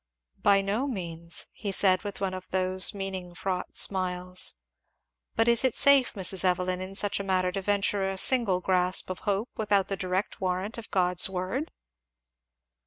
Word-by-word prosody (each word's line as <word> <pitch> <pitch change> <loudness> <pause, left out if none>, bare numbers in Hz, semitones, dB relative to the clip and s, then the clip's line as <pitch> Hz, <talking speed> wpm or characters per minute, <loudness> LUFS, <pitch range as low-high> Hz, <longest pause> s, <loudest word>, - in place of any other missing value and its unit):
"By 200 -1 +4
no 210 +8 -1
means," 170 -7 -3
he 205 - -5
said 190 -1 +3
with 205 -1 -6
one 195 -1 -2
of 185 0 -8
those 185 0 +1
meaning 190 -3 -6
fraught 185 0 -4
smiles, 180 -1 +2 0.8
"but 225 +1 +2
is 235 0 +3
it 260 -3 +1
safe, 280 -3 +4
Mrs. 190 -2 +1
Evelyn, 185 0 0
in 190 +1 -7
such 205 0 +1
a - - -3
matter, 185 -1 0
to 195 - -4
venture 200 0 0
a 195 - -4
single 205 -5 +3
grasp 185 0 +1
of 185 - -6
hope 205 +4 -1
without 205 -3 +1
the 195 - -1
direct 185 +1 -3
warrant 190 +5 -2
of 225 - -11
God's 180 -1 +2
word?" 190 - -3
190 Hz, 170 wpm, -27 LUFS, 185-205 Hz, 0.8 s, By